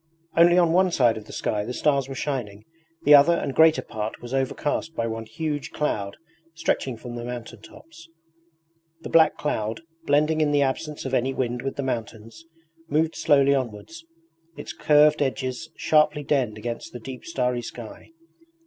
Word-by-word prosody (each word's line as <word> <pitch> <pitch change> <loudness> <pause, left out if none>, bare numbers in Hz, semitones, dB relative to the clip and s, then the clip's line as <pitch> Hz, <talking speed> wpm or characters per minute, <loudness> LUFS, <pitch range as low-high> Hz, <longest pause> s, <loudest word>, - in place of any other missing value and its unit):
Only 175 +1 +6
on 170 -2 +4
one 185 +1 +4
side 120 -9 +3
of 110 -1 -8
the - - -12
sky 105 -1 -2
the 125 +4 -5
stars 140 -3 +1
were 135 - -6
shining, 115 -8 -4 0.4
the 145 - +6
other 145 +4 +7
and 140 - -3
greater 160 +1 +5
part 110 0 -5
was 120 +1 -9
overcast 145 +4 -2
by 115 - -1
one 115 0 -5
huge 145 +4 -4
cloud 100 -10 -3 0.4
stretching 130 -6 -1
from 120 +1 -9
the 120 0 -6
mountaintops. 125 - -10 0.9
The - - -7
black 160 -1 +5
cloud, 110 -2 -2 0.3
blending 150 +2 +2
in 150 -1 +2
the 145 -1 +3
absence 145 +3 -3
of 130 - -4
any 130 +1 0
wind 120 -1 -2
with 135 +1 -4
the 140 - -3
mountains, 115 +3 -5 0.5
moved 155 +2 +1
slowly 140 -1 +4
onwards, 130 +5 -4 0.5
its - - -7
curved 150 0 +4
edges 135 +3 -2
sharply 150 -1 +2
denned 130 -7 0
against 115 +2 -6
the 120 - -7
deep 125 +2 -9
starry 125 -6 -1
sky. 115 -1 -10
135 Hz, 165 wpm, -24 LUFS, 120-150 Hz, 0.9 s, other